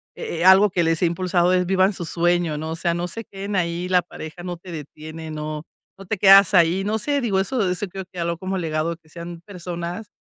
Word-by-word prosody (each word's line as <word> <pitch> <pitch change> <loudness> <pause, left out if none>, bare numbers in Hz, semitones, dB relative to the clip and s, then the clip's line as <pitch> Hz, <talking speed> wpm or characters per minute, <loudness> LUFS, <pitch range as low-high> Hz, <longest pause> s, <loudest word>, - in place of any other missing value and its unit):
eh 165 - -5
eh, 175 - 0
algo 195 +2 +7
que 175 -1 0
les 165 -1 +1
he 180 - +4
impulsado 175 +1 +1
es 180 0 +2
vivan 190 +2 +3
su 180 - -5
sueño, 170 -2 +1
¿no? 160 +1 -4
O - - -3
sea, 170 +1 0
no 175 +1 -2
se 225 +5 -5
queden 200 +1 -6
ahí, 175 0 -1
la 180 -1 +3
pareja 170 0 -10
no 175 -1 -5
te 175 +1 -12
detiene, 155 +1 -8
no, 150 0 -5 0.3
no 195 - -11
te 215 +3 -2
quedas 195 0 +7
ahí. 180 +1 +4
No 215 +2 0
sé, 285 +4 0
digo 200 -5 +1
eso 200 -1 0
eso 180 +3 -1
creo 190 +1 -7
que 180 - -8
habló 170 0 -1
como 190 +2 -3
legado, 165 0 -2
que 160 -2 -29
sean 170 0 -8
personas 180 +1 -6
175 Hz, 240 wpm, -22 LUFS, 170-190 Hz, 0.3 s, algo